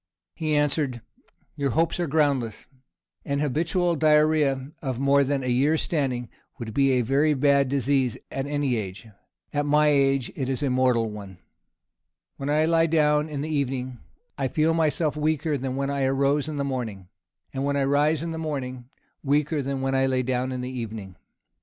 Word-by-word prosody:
He 155 -2 -1
answered, 145 -4 0 0.5
"Your 140 -2 -1
hopes 165 +6 0
are 175 - 0
groundless. 140 -7 0 0.6
An 140 - -2
habitual 165 +5 0
diarrhoea 150 -3 +2
of 130 -4 -3
more 140 +1 +4
than 140 0 -1
a - - -3
year's 140 +6 +2
standing, 130 -6 -1 0.3
would 115 -4 -6
be 135 +1 +3
a 125 - +3
very 140 +5 +2
bad 140 -1 +3
disease 135 -2 +1
at 135 +1 -3
any 145 -4 0
age; 95 -1 -6 0.5
at 145 0 0
my 150 +1 +4
age 135 -3 +2
it 130 -2 -3
is 135 +2 -1
a 135 - +1
mortal 125 -3 +2
one. 100 -3 -9 1.0
When 140 +1 -4
I 155 +2 +3
lie 165 0 +3
down 150 -1 +2
in 145 -2 -4
the 155 +1 -2
evening, 130 -3 -2 0.4
I 135 - +1
feel 155 +5 +1
myself 155 -2 +1
weaker 155 0 0
than 130 -1 -3
when 140 +1 -1
I 140 -1 0
rose 140 +2 +1
in 150 - -4
the 140 - -1
morning; 115 -9 -4 0.5
and 135 0 -2
when 140 0 0
I 140 - +2
rise 145 +3 +2
in 165 - -3
the 160 - -5
morning, 130 -5 -5 0.3
weaker 150 +2 +1
than 135 0 -3
when 135 0 -1
I 135 0 +2
lay 130 -1 +1
down 130 +1 -1
in 125 -1 -3
the 125 +1 -4
evening. 105 -5 -7
140 Hz, 185 wpm, -25 LUFS, 130-150 Hz, 1.0 s, more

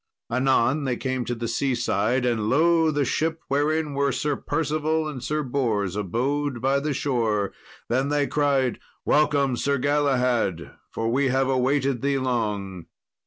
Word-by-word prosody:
Anon 130 +3 +2
they 125 -2 -1
came 130 -2 -2
to 120 - -2
the 115 0 -4
seaside, 125 0 0
and 110 -3 0
lo! 165 +4 +4
the 145 -2 0
ship, 160 +4 -1
wherein 150 +2 0
were 140 0 +1
Sir 145 +2 -1
Percival 155 +2 -1
and 135 -5 -6
Sir 150 +3 -1
Bors, 115 -8 -1
abode 130 +7 -1
by 135 +3 +1
the 150 +2 -2
shore. 115 -8 0 0.3
Then 130 +3 0
they 145 -1 +1
cried, 140 -5 +1 0.3
"Welcome, 145 -3 +2
Sir 140 +3 0
Galahad, 125 - +1 0.2
for 115 0 -2
we 135 +3 +2
have 130 +1 +1
awaited 135 0 +1
thee 140 0 +1
long." 105 -8 -2
135 Hz, 150 wpm, -24 LUFS, 120-145 Hz, 0.3 s, lo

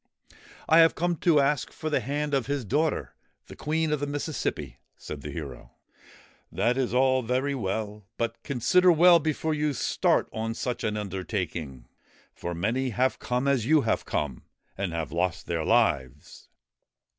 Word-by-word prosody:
' - - -22
I 160 - +6
have 165 0 +6
come 175 +1 0
to 160 -1 +3
ask 140 0 +1
for 155 -1 -5
the - - +2
hand 145 +1 -3
of 135 -4 +1
his 140 -3 -2
daughter, 150 +9 0 0.3
the - - -12
Queen 160 +1 -1
of 150 - 0
the 145 - -2
Mississippi,' 140 - -3 0.2
said 75 -2 -8
the 75 - -7
hero. 65 -5 -8 0.4
' - - -22 0.3
That 120 +2 +1
is 130 -2 -1
all 130 +1 +3
very 130 +4 -1
well; 105 -3 -4
but 115 0 -3
consider 175 +8 +3
well 170 +1 +7
before 155 0 -1
you 150 -1 0
start 120 - +1
on 115 +1 -3
such 125 0 -3
an 105 0 -1
undertaking; 90 - -4 0.5
for 85 0 -5
many 120 +9 0
have 125 +3 0
come 125 +2 -1
as 130 -5 +1
you 155 0 +5
have 115 - 0
come 70 -4 -2 0.3
and 95 -3 -3
have 80 -2 -3
lost 85 0 -1
their 85 -2 -2
lives.' 75 - 0
125 Hz, 170 wpm, -27 LUFS, 90-145 Hz, 0.5 s, well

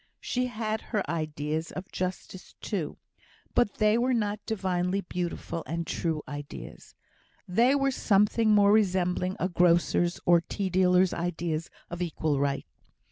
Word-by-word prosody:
She 250 0 -1
had 220 -2 -3
her 210 -7 -2
ideas 155 0 -3
of 185 +1 -7
justice, 185 0 -5
too; - - -3 0.6
but 220 -5 +2
they 215 +1 +3
were 250 +1 +2
not 210 -2 -1
divinely 190 -3 0
beautiful 175 -2 -4
and 165 +1 -3
true 160 -3 -2
ideas; 145 -1 -9 0.5
they 235 +9 +4
were 275 -1 +2
something 215 -1 +2
more 205 -1 +6
resembling 185 -3 +2
a 180 - +1
grocer's, 175 0 +2
or 175 -1 +5
tea 190 +2 -3
dealer's 180 0 +4
ideas 170 -2 -2 0.2
of 175 +1 -5
equal 155 -4 -1
right. 140 -1 0
180 Hz, 135 wpm, -28 LUFS, 170-210 Hz, 0.6 s, more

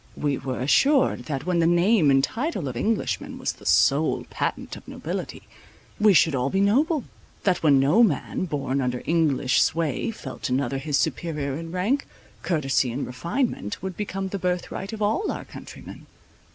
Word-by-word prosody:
We 145 -2 -1
were 130 -1 -4
assured 270 - +3
that, 140 -2 -4
when 180 -1 +1
the 165 - +3
name 175 -1 +4
and 135 0 +4
title 230 - -2
of 125 - -5
Englishman 220 - -1
was - - -2
the - - -11
sole - - +3
patent - - -3
of - - -13
nobility, - - -5 0.6
we 210 -2 +5
should 160 0 +5
all 130 0 0
be 195 - 0
noble; 270 - +2 0.4
that 185 -3 +1
when 145 -4 +5
no 150 - +4
man 185 - +1
born 140 -4 -2
under 125 -1 -2
English 145 -6 +2
sway, 165 - 0
felt 220 -9 -6
another 135 +1 0
his 140 +1 0
superior 150 -2 -2
in 165 +2 -6
rank, 205 +11 0 0.3
courtesy 135 -7 +1
and 130 +4 -3
refinement 170 - -3
would 190 -2 -4
become 195 -2 -4
the 200 - -4
birth 180 -1 -2
right 195 +3 -5
of 215 -1 -3
all 290 - +1
our - - -6
countrymen. - - -11
165 Hz, 175 wpm, -24 LUFS, 135-200 Hz, 0.6 s, we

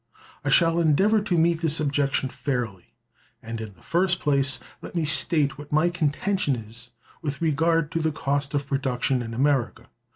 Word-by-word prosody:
I - - -1
shall 165 -1 +4
endeavor 190 +7 +3
to 190 -4 -1
meet 165 0 +2
this 160 -2 +4
objection 140 -2 0
fairly, 120 -10 -4 0.4
and, 115 0 -7
in 110 -2 -8
the 90 - -23
first 180 +1 +2
place, 140 -2 +2 0.2
let - - -9
me 165 -2 0
state 150 -2 +3
what 145 0 -11
my 155 +4 +2
contention 170 -1 0
is 115 +1 -8 0.3
with 145 -3 -4
regard 165 0 +1
to 165 - -1
the 160 -1 0
cost 140 -1 -2
of 140 -1 -1
production 135 -2 -1
in 115 -1 -6
America. 135 -1 0
145 Hz, 170 wpm, -24 LUFS, 135-165 Hz, 0.4 s, shall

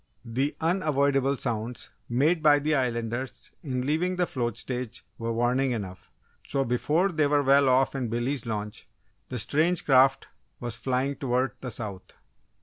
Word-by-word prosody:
The 130 +5 -1
unavoidable 140 -5 +1
sounds 120 0 -4 0.2
made 150 +8 +2
by 150 -1 +6
the 150 +2 0
Islanders 120 -1 -2
in 130 -4 -3
leaving 170 +6 0
the 180 0 +1
float 120 -8 -3
stage 125 -2 -4
were 115 0 -2
warning 125 +3 +1
enough, 95 -5 -6 0.3
so 135 -1 -1
before 150 +10 +1
they 155 -3 +2
were 145 0 +2
well 140 0 +5
off 130 +1 +3
in 130 -3 -2
Billy's 120 +2 -2
launch 105 -1 -5 0.4
the 125 - -4
strange 160 +9 +1
craft 135 -1 +5 0.3
was 120 -2 -4
flying 130 +3 -1
toward 130 0 0
the 125 - -4
south. 105 -5 -7
130 Hz, 150 wpm, -27 LUFS, 120-145 Hz, 0.4 s, by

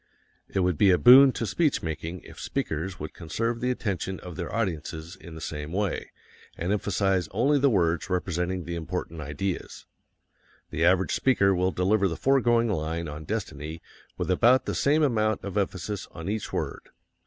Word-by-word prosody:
It 95 - 0
would 90 -4 0
be 100 - +6
a 90 - +5
boon 130 +5 +9
to 115 - -2
speech 150 - +1
making 80 +2 -4
if - - -13
speakers 85 +4 -3
would 75 - -6
conserve 115 +8 -3
the 125 - 0
attention 95 -6 -2
of 90 -2 -8
their 90 0 -5
audiences 85 -5 -3
in 85 -3 -12
the 80 - -9
same 75 -1 -5
way 100 0 -2 0.5
and 85 +3 -2
emphasize 95 -3 0
only 135 +8 +2
the 140 +1 +4
words 85 -5 +1
representing 90 0 -1
the 85 - -5
important 85 -1 -4
ideas. 75 +6 -4 0.9
The 80 0 -1
average 95 +2 +3
speaker 100 -7 +3
will 90 0 +1
deliver 95 +3 +2
the 85 -3 -4
foregoing 120 - +3
line 85 -4 -2
on 75 +1 -7
destiny 80 -7 -4 0.4
with 90 +1 -1
about 120 +7 +4
the - - -2
same 150 +3 +2
amount 110 -6 +1
of 100 -1 -6
emphasis 100 0 -2
on 80 0 -8
each 110 0 -3
word. - - -4
95 Hz, 175 wpm, -27 LUFS, 85-110 Hz, 0.9 s, boon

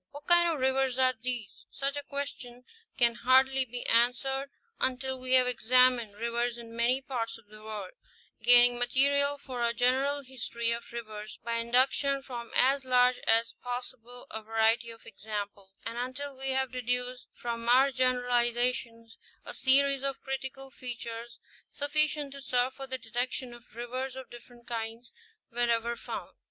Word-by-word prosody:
What 290 +1 -11
kinds 345 -1 +5
of - - -6
rivers 265 -1 +1
are 255 -1 +4
these? 245 -4 -5
Such 275 +1 -2
a 290 - -3
question 275 -4 -6 0.3
can 235 -1 +4
hardly 260 +2 +4
be 245 0 -6
answered 265 +4 +2 0.3
until 260 0 -1
we 255 0 -2
have 255 -1 +7
examined 250 -2 +3
rivers 235 +2 -1
in 230 -1 -10
many 240 +3 +2
parts 235 -4 -4
of 230 - -20
the 215 +1 -15
world, 215 -3 -6 0.5
gaining 245 +1 +6
material 280 +3 +2
for 255 -4 -5
a 235 0 +1
general 270 +4 +2
history 235 -3 -3
of 235 0 -4
rivers 215 -2 -7
by 230 0 -1
induc 250 +3 +4
tion 275 -1 -1
from 240 -3 -7
as 270 +2 +4
large 250 -1 +4
as 230 +1 +3
possible 245 -1 -6
a 220 - -4
variety 225 +2 +1
of 230 0 -11
examples; 205 -2 -6
and 230 +1 -4
until 265 +3 -5
we 270 +1 -4
have 265 -1 0
deduced 250 0 -2
from 235 0 -4
our 265 +3 +6
generalizations 245 -2 0 0.3
a - - -5
series 275 0 +4
of 275 0 -3
critical 270 0 -5
features 235 -1 -7 0.3
sufficient 295 0 0
to 275 - -9
serve 250 0 0
for 270 -1 -8
the 260 0 -3
detection 245 +2 -3
of 240 -2 -16
rivers 255 +2 -4
of 265 -1 -9
different 240 0 -14
kinds 230 0 -5 0.4
wherever 235 0 0
found. - - -7
245 Hz, 160 wpm, -29 LUFS, 235-265 Hz, 0.5 s, have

